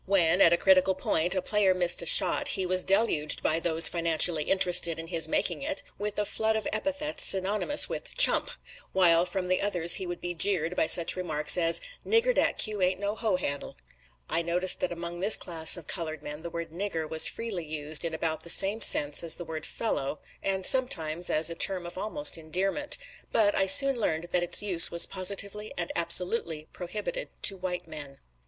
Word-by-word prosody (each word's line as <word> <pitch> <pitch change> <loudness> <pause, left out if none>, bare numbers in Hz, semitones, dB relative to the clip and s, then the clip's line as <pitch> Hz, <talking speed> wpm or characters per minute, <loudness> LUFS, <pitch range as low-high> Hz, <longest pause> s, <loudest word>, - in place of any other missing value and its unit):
When, 185 -2 +1
at 165 - +5
a 170 - +2
critical 190 0 +2
point, 175 -1 0
a 185 - -3
player 200 -3 +1
missed 175 -1 +3
a 170 - -7
shot, - - +2
he 190 - -2
was 185 0 0
deluged, 195 -7 0
by 160 +1 0
those 165 -1 +6
financially 165 -2 +2
interested 180 -3 +2
in 165 0 -9
his 165 -3 +3
making - - -2
it, 290 +1 -5 0.2
with 210 0 -5
a 210 - -2
flood 220 +1 -1
of 220 - -4
epithets 290 +7 -4
synonymous 205 +9 +2
with - - -8
"chump"; - - +4 0.4
While 175 -2 +2
from 180 0 -5
the 185 0 -1
others 175 -4 +3
he 185 - -5
would 175 0 -7
be 175 0 -6
jeered 175 -1 -1
by 160 - -1
such 170 0 +2
remarks 155 -5 -1
as 170 -2 +1 0.2
"Nigger, 460 +3 +1
dat - - -1
cue 210 -3 -2
ain't 185 +1 -1
no 205 0 -4
hoe 220 -4 -2
handle." 145 -6 -5 0.5
I - - -1
noticed 175 +2 +2
that 180 - -3
among 170 0 -7
this 200 +4 +6
class 165 -1 -2
of 170 - -11
colored 160 -4 -6
men 150 +1 -8
the 170 - -8
word 170 -1 -8
"nigger" 165 -3 -5
was 160 0 +3
freely 210 -8 -6
used 150 0 -2
in 165 -1 -5
about 160 -1 -3
the 170 - -8
same 200 +6 +3
sense 145 -6 +4
as 165 -1 +3
the 175 - -8
word 160 -1 -8
"fellow," 145 -10 -4 0.2
and 190 -1 -2
sometimes 175 - +1
as 155 +2 +1
a - - -4
term 180 +1 -1
of 175 - -10
almost 215 - -2
endearment; 190 - -2 0.3
but 205 -2 +1
I 195 - 0
soon 275 +7 +7
learned 170 -6 -4
that 180 - 0
its 175 +3 -1
use 180 -5 +3
was 170 - +7
positively 200 +2 -5
and 175 - -4
absolutely 170 -2 +1
prohibited 215 - -7
to 195 - +2
white 180 -1 -6
men. 145 -3 -10
180 Hz, 200 wpm, -26 LUFS, 165-200 Hz, 0.5 s, soon